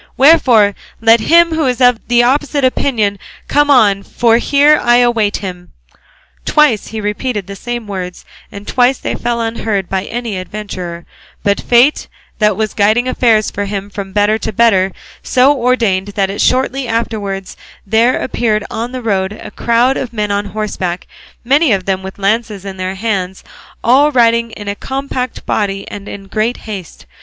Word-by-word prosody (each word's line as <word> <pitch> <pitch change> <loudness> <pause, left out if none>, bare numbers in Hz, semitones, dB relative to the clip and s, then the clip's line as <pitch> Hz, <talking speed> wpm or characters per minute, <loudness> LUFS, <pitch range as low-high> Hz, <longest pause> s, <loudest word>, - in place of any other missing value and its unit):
Wherefore, 255 -8 +5 0.3
let 225 +1 +5
him 335 +8 +4
who 315 -3 0
is 250 -1 -1
of 245 -2 +4
the 240 0 +4
opposite 280 +2 +1
opinion 220 -6 0 0.3
come 290 0 +2
on, 210 -8 +4
for 230 +3 +1
here 290 +3 +4
I 240 0 +4
await 240 -4 +2
him." 180 -1 -8 0.7
Twice 290 -9 +2
he 220 - -6
repeated 210 0 -3
the 200 +1 -8
same 240 +3 -5
words, 185 -3 -6 0.3
and 200 0 -10
twice 255 +1 +2
they - - -4
fell 235 0 -2
unheard 225 -4 -2
by 190 0 -2
any 230 -5 -4
adventurer; 185 -3 -7 0.4
but 200 0 +1
fate, 245 +5 +3 0.3
that 210 -3 +2
was 215 -1 -2
guiding 215 +4 +2
affairs 225 -4 +2
for 205 - -3
him 200 0 -5
from 200 -2 -6
better 210 +2 +1
to 220 - -3
better, 195 -4 +3 0.3
so 260 +3 +3
ordered 235 -7 0
it 205 - -12
that 195 0 -1
shortly 260 0 +1
afterwards 205 -4 -3 0.3
there 225 +5 +2
appeared 215 -4 -1
on 235 +3 -4
the 255 -1 -5
road 190 -3 0
a - - -10
crowd 240 +3 +1
of 245 -3 -5
men 210 -2 -2
on 200 0 -1
horseback, 195 -3 -4 0.4
many 280 +3 +3
of 190 -3 0
them 190 -1 -1
with 190 0 -8
lances 205 0 -1
in 195 -1 -7
their 185 +1 -3
hands, 190 -3 -3 0.4
all 275 +6 +4
riding 235 -2 +3
in 205 -1 -9
a 200 - -1
compact 265 +1 -5
body 195 -2 -2
and 205 0 -8
in 195 -1 -8
great 215 +4 -1
haste. 195 -7 -8
220 Hz, 170 wpm, -14 LUFS, 200-245 Hz, 0.7 s, Wherefore